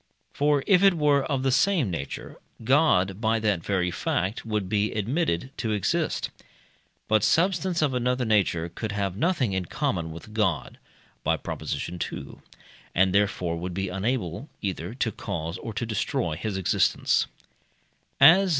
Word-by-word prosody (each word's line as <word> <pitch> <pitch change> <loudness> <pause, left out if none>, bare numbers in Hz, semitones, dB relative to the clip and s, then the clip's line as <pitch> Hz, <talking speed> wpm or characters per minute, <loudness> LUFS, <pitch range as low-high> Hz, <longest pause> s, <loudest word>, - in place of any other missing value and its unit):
For 145 -1 +2
if 185 -3 +5
it 195 -2 +6
were 145 -3 +3
of 135 -3 -1
the 135 - +2
same 145 - +2
nature, 70 -5 -6 0.3
God, 110 - +3
by 110 0 +2
that 105 -6 +1
very 90 -3 0
fact, 90 +3 -1
would 105 -4 -2
be 105 +2 +1
admitted 120 - -1
to 110 -3 -1
exist. 105 -3 0 0.8
But 110 -1 +3
substance 180 - +2
of 140 -3 +1
another 125 0 0
nature 95 -6 +2
could 105 +4 -5
have 100 -3 -2
nothing 130 - +1
in 95 -1 -1
common 85 0 -2
with 85 +6 -10
God 95 - -1 0.4
(by - - +2
Prop. - - -6
ii.), 90 0 -4 1.0
and 95 +1 +4
therefore 95 -4 +1
would 90 +1 -5
be 95 0 -2
unable 95 - -2
either 95 +1 -4
to 120 -3 0
cause 85 -4 -4
or 115 - -6
to 115 +3 -3
destroy 100 -6 -1
his 95 +4 -3
existence. 95 - +2
105 Hz, 150 wpm, -26 LUFS, 90-130 Hz, 1.0 s, it